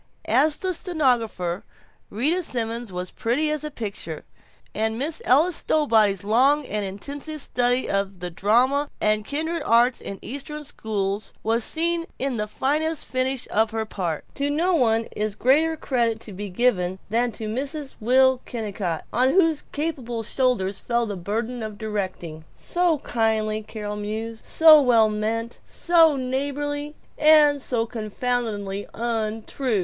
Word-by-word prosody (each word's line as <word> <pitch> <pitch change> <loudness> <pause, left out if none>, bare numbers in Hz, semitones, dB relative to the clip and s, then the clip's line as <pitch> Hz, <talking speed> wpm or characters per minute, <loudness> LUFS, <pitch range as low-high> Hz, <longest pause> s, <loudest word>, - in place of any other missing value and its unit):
As 305 0 +3
the 375 -1 -1
stenographer 245 - 0 0.5
Rita 295 - 0
Simons 235 - -2
was 180 0 -5
pretty 285 +7 0
as 305 -1 -2
a 300 - -3
picture, 200 - -6 0.5
and 220 +1 -1
Miss 300 +5 -2
Ella 305 +8 +4
Stowbody's 220 - +2
long 265 +8 +3
and 210 -3 -2
intensive 280 +11 -5
study 245 -1 +1
of 195 -1 -1
the 180 0 -4
drama 255 - +2
and 215 0 +2
kindred 320 +7 -2
arts 240 -1 +3
in 195 - -6
Eastern 295 +4 -6
schools 205 -6 -3
was 225 +1 +1
seen 335 +3 +1
in 265 -2 -2
the 210 0 -2
fine 280 +8 0
finish 260 -3 -1
of 220 +1 +2
her 220 0 -2
part.... 175 -7 -3
to 280 +1 -1
no 335 +6 +1
one 230 -6 +3
is 210 -1 -2
greater 310 +8 +3
credit 235 -6 0
to 210 - -8
be 200 +2 -6
given 185 -3 +1
than 235 +2 +1
to 220 - -5
Mrs. 275 +5 -4
Will 260 +3 +4
Kennicott 200 -8 -4
on 255 +2 +3
whose 325 -2 +2
capable 260 -7 -3
shoulders 210 -6 0
fell 235 -1 0
the 205 -2 -4
burden 225 +7 -3
of 215 -2 -6
directing. 190 -7 -4
"So 350 -2 +1
kindly," 220 -2 0
Carol 210 -1 -6
mused, 220 +2 -5
"so 315 -2 +7
well 230 -5 +4
meant, 225 +2 -3
so 330 -3 +4
neighborly 285 +3 -3 0.2
and 300 -2 +6
so 235 -3 -1
confoundedly 215 -3 -3
untrue. 225 +1 -1
235 Hz, 145 wpm, -24 LUFS, 215-285 Hz, 0.5 s, so